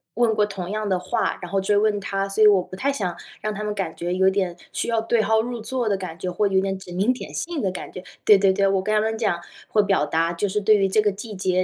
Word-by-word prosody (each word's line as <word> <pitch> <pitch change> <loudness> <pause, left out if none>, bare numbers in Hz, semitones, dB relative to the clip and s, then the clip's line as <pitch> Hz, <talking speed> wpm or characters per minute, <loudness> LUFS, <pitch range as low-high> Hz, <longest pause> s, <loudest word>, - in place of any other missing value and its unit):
问 235 -1 +3
过 215 - +2
同 190 -3 -6
样 215 0 -2
的 185 - +2
话， 180 +1 -1
然 175 - -7
后 195 - +1
追 205 +2 +2
问 210 0 +2
他， 195 0 -2
所 200 +2 +2
以 - - +9
我 200 -3 +5
不 185 - -10
太 270 +8 0
想 185 -10 -3 0.3
让 215 0 -2
他 210 +1 -5
们 210 0 -2
感 185 -5 -3
觉 175 +1 -3
有 190 +1 +3
点 190 -2 0 0.2
需 - - -2
要 230 -1 +2
对 225 0 +2
号 220 +1 +2
入 240 0 -5
座 245 +1 -2
的 205 - +2
感 185 -4 -6
觉， 180 +1 -4
或 205 +4 +1
者 190 - -2
有 190 - +5
点 195 0 -2
指 185 - -11
名 200 +8 +2
点 255 - -8
姓 335 -3 -3
的 195 - 0
感 180 - -7
觉。 185 - -8 0.2
对 210 - +8
对 195 -1 +4
对， 195 +1 +2
我 195 -1 +2
跟 215 - -2
他 215 - +4
们 220 +1 -1
讲 205 -7 0 0.3
或 210 - +3
表 195 -6 +2
达， 165 +3 0
就 185 +4 -1
是 210 +2 0
对 215 +1 +4
于 195 -1 +2
这 200 - +2
个 210 -1 +3
季 210 +2 -8
节， 185 -1 +1
200 Hz, 325 characters per minute, -23 LUFS, 185-215 Hz, 0.3 s, 以